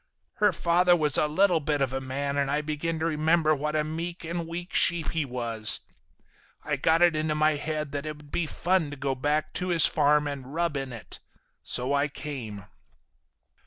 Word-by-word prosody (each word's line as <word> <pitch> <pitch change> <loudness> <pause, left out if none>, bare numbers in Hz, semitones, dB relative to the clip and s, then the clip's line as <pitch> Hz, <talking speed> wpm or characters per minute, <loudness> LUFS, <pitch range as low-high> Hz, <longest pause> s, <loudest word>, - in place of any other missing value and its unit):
Her 210 -1 +4
father 175 +1 +3
was 150 -4 +1
a 150 - +5
little 180 +2 +3
bit 145 0 -1
of 135 -2 0
a 135 - -2
man 140 +2 -3
and 140 -1 0
I 145 +2 +1
began 155 +2 -3
to 160 - -2
remember 160 0 +2
what 150 +1 -2
a 155 - +2
meek 170 +3 -5
and 170 0 -4
weak 175 +2 -6
sheep 170 -2 +2
he 160 -3 -1
was. 115 -4 0 0.8
I 150 - -1
got 160 +5 +3
it 175 -2 +4
into 155 0 0
my 155 +1 +3
head 150 0 -3
that 145 +1 -4
it'd 150 -1 -8
be 170 - -1
fun 175 -1 0
to 145 - -7
go 135 0 -1
back 150 +4 -1
to 180 - -3
his 170 -3 +4
farm 150 0 +3
and 140 0 -6
rub 170 -2 0
it 135 -2 -3
in. 115 -3 -8 0.6
So 125 +3 +1
I 140 +1 +2
came. 125 - -7
150 Hz, 200 wpm, -27 LUFS, 140-165 Hz, 0.8 s, a